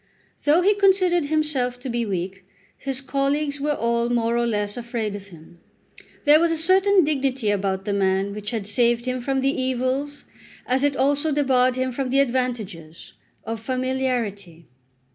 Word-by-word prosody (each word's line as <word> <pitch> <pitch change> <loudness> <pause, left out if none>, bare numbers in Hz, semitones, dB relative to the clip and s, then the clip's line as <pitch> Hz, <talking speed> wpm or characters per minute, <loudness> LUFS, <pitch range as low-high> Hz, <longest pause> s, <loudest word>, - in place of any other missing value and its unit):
Though 310 +5 +4
he 410 +3 +5
considered 375 -5 +3
himself 285 -5 0
to 265 - -6
be 235 -2 -2
weak, 190 0 -4 0.3
his 270 -1 -3
colleagues 280 +1 -1
were 295 +1 0
all 235 0 0
more 235 -1 +1
or 235 0 +1
less 205 -2 -1
afraid 235 -3 -4
of 200 -1 -9
him. 170 -1 -16 0.7
There 295 +1 +7
was 335 0 +2
a 330 - 0
certain 375 +5 +3
silent 370 -5 +5
dignity 270 -6 0
about 195 -1 -1
the 205 - -1
man 195 0 0
which 210 +1 -5
saved 235 +3 +1
him 255 0 -2
from 270 +1 -1
the 275 +1 +1
evils, 260 +3 -2 0.4
as 260 +2 0
it 285 -1 +2
also 285 +3 +1
debarred 255 -3 +2
him 255 0 -1
from 260 +1 -3
the 270 +2 +2
advantages, 235 - -3 0.3
of 225 +1 -4
familiarity. 240 -8 -3
255 Hz, 165 wpm, -23 LUFS, 210-285 Hz, 0.7 s, There